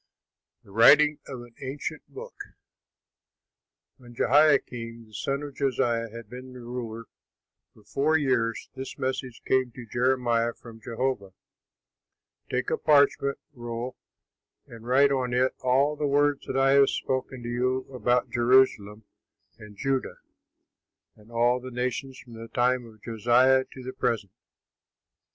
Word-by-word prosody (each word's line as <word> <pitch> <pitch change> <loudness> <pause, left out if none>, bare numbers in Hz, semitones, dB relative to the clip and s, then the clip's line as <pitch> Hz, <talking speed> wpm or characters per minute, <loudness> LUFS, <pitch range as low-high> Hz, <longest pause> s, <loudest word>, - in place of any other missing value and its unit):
THE 100 - -18
WRITING 150 +8 +6
OF 130 -3 -7
AN 120 -1 -17
ANCIENT 145 +3 -5
BOOK 485 +4 -10 1.6
When 120 -2 -15
Jehoiakim, 120 -5 +2
the 110 - -22
son 140 +6 -2
of 145 -1 -7
Josiah, 120 -4 0
had 115 +1 -10
been 125 +1 -10
ruler 120 -2 -6 0.7
for 105 - -20
four 145 +9 +1
years, 125 -6 0
this 135 0 -7
message 130 -2 -4
came 130 -2 +1
to 120 - -9
Jeremiah 120 -1 +1
from 115 -2 -13
Jehovah, 115 -5 -3 1.2
"Take 130 0 -1
a - - 0
parchment 140 -2 +3 0.2
roll 120 0 -5 0.7
and 115 0 -12
write 140 +3 +4
on 125 -2 0
it 130 +1 +2
all 135 +4 +2
the 150 0 -1
words 145 0 +1
that 130 - -2
I 135 0 +4
have 140 0 +6
spoken 130 -1 -3
to 120 - -5
you 130 +2 0
about 125 -1 +1
Jerusalem 120 -4 +3 0.6
and 105 -2 -13
Judah 135 +1 -1 1.0
and 105 +1 -20
all 120 +2 +2
the 130 +1 -8
nations 125 +2 -3
from 120 - -14
the 115 0 -9
time 125 +1 +1
of 110 -2 -18
Josiah 120 +4 +3
to 130 - -10
the 130 +1 -6
present. 105 -5 -1
125 Hz, 135 wpm, -26 LUFS, 115-135 Hz, 1.6 s, WRITING